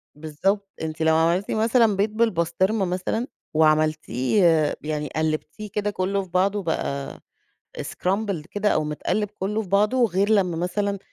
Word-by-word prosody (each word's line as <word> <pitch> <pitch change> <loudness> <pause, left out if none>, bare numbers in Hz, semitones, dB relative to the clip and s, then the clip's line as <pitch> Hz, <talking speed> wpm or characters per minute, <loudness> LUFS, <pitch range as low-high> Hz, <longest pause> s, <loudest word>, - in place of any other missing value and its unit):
بالضبط، 190 +7 -1
أنتِ 160 0 -4
لو 160 0 +4
عملتِ 170 +5 +1
مثلًا 225 -1 +3
بيض 205 +2 +1
بالبسطرمة 195 -1 +1
مثلًا 185 +7 -2 0.3
وعملتيه 155 - +2
آآ، 160 -3 +3
يعني 150 -1 -3
قلّبتيه 155 +7 -2
كده 210 0 -1
كلّه 195 +1 -1
في 185 - -14
بعضه 195 +3 +1
بقى 140 -4 -3 0.6
scrambled 190 +1 -2
كده 205 0 0
أو 155 - +1
متقلب 195 +7 -2
كلّه 210 +3 -1
في 190 - -10
بعضه 210 +6 +3
غير 195 +2 0
لمّا 185 -6 +2
مثلًا 200 +3 -1
185 Hz, 145 wpm, -24 LUFS, 160-205 Hz, 0.6 s, لو